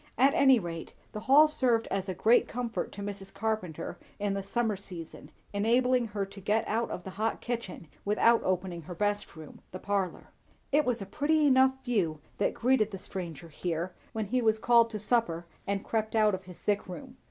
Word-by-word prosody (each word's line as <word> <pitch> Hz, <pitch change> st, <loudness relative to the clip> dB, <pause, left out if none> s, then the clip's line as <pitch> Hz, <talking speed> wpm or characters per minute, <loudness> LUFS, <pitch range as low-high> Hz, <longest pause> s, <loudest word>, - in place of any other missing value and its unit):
At 270 Hz, +4 st, +5 dB
any 265 Hz, -2 st, +6 dB
rate, 165 Hz, -3 st, -6 dB, 0.2 s
the 215 Hz, -, -5 dB
hall 280 Hz, +7 st, +6 dB
served 255 Hz, -7 st, +1 dB
as 195 Hz, 0 st, -1 dB
a 185 Hz, -, -2 dB
great 225 Hz, +6 st, +4 dB
comfort 240 Hz, -1 st, -3 dB
to 200 Hz, -, -6 dB
Mrs. 200 Hz, -1 st, -6 dB
Carpenter 200 Hz, -6 st, -3 dB, 0.2 s
in 205 Hz, -1 st, -1 dB
the 195 Hz, -, -2 dB
summer 220 Hz, +2 st, 0 dB
season, 180 Hz, -4 st, -9 dB, 0.2 s
enabling 240 Hz, +4 st, +2 dB
her 205 Hz, -2 st, -2 dB
to 195 Hz, +1 st, -12 dB
get 210 Hz, +3 st, +1 dB
out 230 Hz, +2 st, 0 dB
of 180 Hz, -, -5 dB
the 190 Hz, -, -7 dB
hot 215 Hz, +4 st, -1 dB
kitchen, 230 Hz, -8 st, -5 dB, 0.2 s
without 230 Hz, +3 st, +4 dB
opening 180 Hz, -2 st, -1 dB
her 175 Hz, +3 st, -8 dB
best 205 Hz, +1 st, -1 dB
room, 155 Hz, -2 st, -11 dB
the 185 Hz, -, -5 dB
"parlour." 195 Hz, -1 st, -2 dB, 0.4 s
It 295 Hz, +1 st, +4 dB
was 240 Hz, -4 st, 0 dB
a -, -, -8 dB
pretty 305 Hz, +7 st, +1 dB
enough 265 Hz, -1 st, +4 dB
view 185 Hz, -, 0 dB, 0.2 s
that -, -, +1 dB
greeted 235 Hz, -3 st, +2 dB
the 195 Hz, -, -6 dB
stranger 170 Hz, -5 st, -6 dB
here, 170 Hz, +3 st, -3 dB, 0.2 s
when 220 Hz, -1 st, -2 dB
he 250 Hz, +5 st, 0 dB
was 220 Hz, -1 st, +3 dB
called 235 Hz, +1 st, +5 dB
to 220 Hz, -, -4 dB
supper 210 Hz, -6 st, 0 dB, 0.2 s
and 200 Hz, 0 st, -1 dB
crept 220 Hz, 0 st, -1 dB
out 215 Hz, -2 st, +4 dB
of 190 Hz, 0 st, -4 dB
his 180 Hz, -2 st, -11 dB
sick 205 Hz, 0 st, -1 dB
room. 250 Hz, +8 st, -9 dB
210 Hz, 200 wpm, -29 LUFS, 190-240 Hz, 0.4 s, any